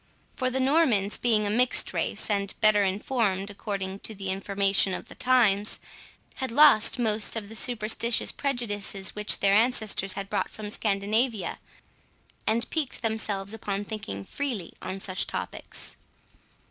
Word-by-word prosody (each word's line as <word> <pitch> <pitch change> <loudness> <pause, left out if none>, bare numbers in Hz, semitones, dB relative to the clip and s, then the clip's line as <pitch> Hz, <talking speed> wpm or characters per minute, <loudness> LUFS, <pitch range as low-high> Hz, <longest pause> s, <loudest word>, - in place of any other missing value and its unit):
For 255 -1 0
the 260 +1 -1
Normans 260 -8 +3
being 220 -3 +2
a 205 - 0
mixed 245 +3 +3
race, - - -1
and 200 -2 -1
better 215 -2 +5
informed 200 0 0
according 195 -1 -4
to 220 - -4
the 195 -1 -5
information 195 0 +1
of - - -8
the - - -9
times, 215 -5 +2 0.6
had 260 - -2
lost 265 -3 +6
most 220 -3 0
of 210 -3 -4
the 225 - -9
superstitious 230 0 -1
prejudices 205 -8 -3
which 210 0 0
their 195 0 +4
ancestors 215 -4 +2
had 195 0 -5
brought - - -1
from 210 -1 -8
Scandinavia, 215 +2 0 0.9
and 230 +2 +1
piqued 295 -6 -2
themselves 215 -3 -2
upon 205 -2 -3
thinking 150 - -6
freely 245 -12 -4
on 190 - -5
such 190 -1 -2
topics. - - -5
210 Hz, 145 wpm, -27 LUFS, 195-235 Hz, 0.9 s, lost